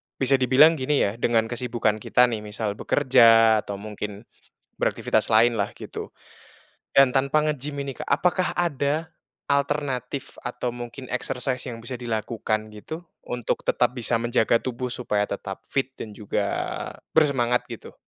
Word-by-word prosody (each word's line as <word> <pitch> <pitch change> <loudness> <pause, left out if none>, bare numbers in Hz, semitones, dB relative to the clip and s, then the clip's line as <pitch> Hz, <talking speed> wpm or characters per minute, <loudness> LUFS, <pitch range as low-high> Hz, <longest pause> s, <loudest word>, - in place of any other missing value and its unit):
bisa 135 0 +2
dibilang 140 +6 +6
gini 140 +2 +2
ya, 100 +3 -1
dengan 115 -2 +2
kesibukan 120 -3 0
kita 125 +3 +3
nih, 110 - -2
misal 105 0 -3
bekerja 115 -5 +5
atau 100 - -4
mungkin 105 +1 -7 0.6
beraktivitas - - +1
lainlah 110 -2 +4
gitu - - -7 0.9
dan 135 -1 +7
tanpa 140 +3 +2
nge-gym 150 -1 -2
ini 135 -1 -5
Kak, - - -5
apakah 180 +5 +1
ada 160 -1 0 0.4
alternatif 140 -2 -1
atau 125 -1 -3
mungkin 120 +2 -8
exercise 125 0 -2
yang 115 -2 -7
bisa 125 +1 -6
dilakukan 110 -2 -2
gitu 155 +11 -8 0.3
untuk 120 -2 -2
tetap 125 0 +2
bisa 120 0 0
menjaga 115 0 +2
tubuh 125 0 -3
supaya 105 -4 -1
tetap 95 -1 -6
fit 135 -1 -1
dan 105 -2 -7
juga 105 -1 -2 0.7
bersemangat 130 -6 +2
gitu? - - -10
125 Hz, 140 wpm, -24 LUFS, 110-135 Hz, 0.9 s, dan